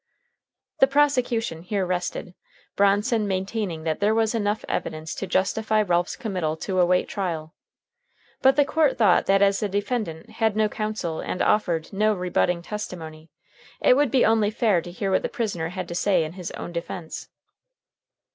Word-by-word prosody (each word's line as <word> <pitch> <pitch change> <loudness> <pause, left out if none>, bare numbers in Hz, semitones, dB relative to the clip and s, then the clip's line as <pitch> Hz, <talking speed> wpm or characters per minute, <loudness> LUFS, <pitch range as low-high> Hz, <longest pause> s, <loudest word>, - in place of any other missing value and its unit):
The 270 - +6
prosecution 250 - +1
here 190 +2 -1
rested, 180 0 -3 0.4
Bronson 205 +3 +2
maintaining 190 -3 -2
that 160 -1 -1
there 210 +2 +2
was 225 0 +2
enough 210 -1 -1
evidence 155 0 -3
to 195 - -5
justify 215 +3 +1
Ralph's 175 -2 0
committal 185 - -2
to 185 +2 -2
await 180 0 +3
trial. 165 -5 -4 0.9
But 265 0 +5
the 290 0 +4
court 300 -1 +2
thought 205 -7 +4
that 195 +1 +4
as 200 0 +3
the 210 - -1
defendant 200 -4 -3
had 220 -2 0
no 215 0 +3
counsel 215 -7 -3
and 180 - -4
offered 175 -5 +1
no 215 +2 +2
rebutting 180 -1 0
testimony, 165 -6 -7 0.5
it - - +5
would 285 0 +3
be 255 +2 +3
only 220 -2 +3
fair 215 -5 +2
to 175 - -9
hear 195 +2 -3
what 190 - +3
the - - -3
prisoner 200 -10 -2
had 180 0 -5
to 170 - -6
say 185 -1 +2
in 155 +1 -6
his 180 -2 -6
own - - -6
defense. 170 -1 -6
195 Hz, 165 wpm, -24 LUFS, 175-220 Hz, 0.9 s, The